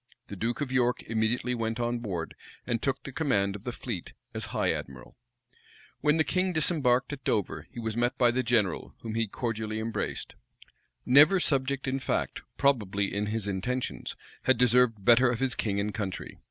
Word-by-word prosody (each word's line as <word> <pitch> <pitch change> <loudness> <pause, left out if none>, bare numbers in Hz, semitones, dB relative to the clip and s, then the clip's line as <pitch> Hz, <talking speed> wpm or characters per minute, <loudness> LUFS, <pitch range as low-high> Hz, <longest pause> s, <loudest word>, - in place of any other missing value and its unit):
The 100 - -6
duke 115 +7 -2
of 140 -3 -2
York 125 -1 +1
immediately 115 +3 0
went 115 -1 -2
on 120 0 0
board, 90 -8 -4 0.3
and 120 -2 -1
took 135 -1 -1
the 135 - -6
command 115 -10 +1
of 105 - -10
the 125 - -2
fleet 115 -7 -6 0.2
as - - -2
high - - 0
admiral. 65 -2 -8 0.8
When 150 +2 +3
the 160 - +4
king 185 +3 0
disembarked 145 -5 +2
at 135 -2 -8
Dover, 85 -6 -1
he - - -9
was 110 -2 -3
met 120 +1 0
by 120 -1 +4
the 130 +2 +1
general, 115 -7 0
whom 110 -1 -5
he 115 0 0
cordially 110 0 -3
embraced. 110 +1 -3 0.7
Never 150 +9 +7
subject 140 -4 +1
in 130 +1 0
fact, 130 - -2 0.2
probably 105 -8 +1
in 105 +1 -1
his 105 -1 -2
intentions, 125 +7 -3 0.3
had 130 - +4
deserved 125 -4 +3
better 120 +3 +6
of 120 -1 -1
his 135 -2 +1
king 100 -3 -1
and 105 +1 -1
country. 100 -4 -5
120 Hz, 180 wpm, -28 LUFS, 105-130 Hz, 0.8 s, Never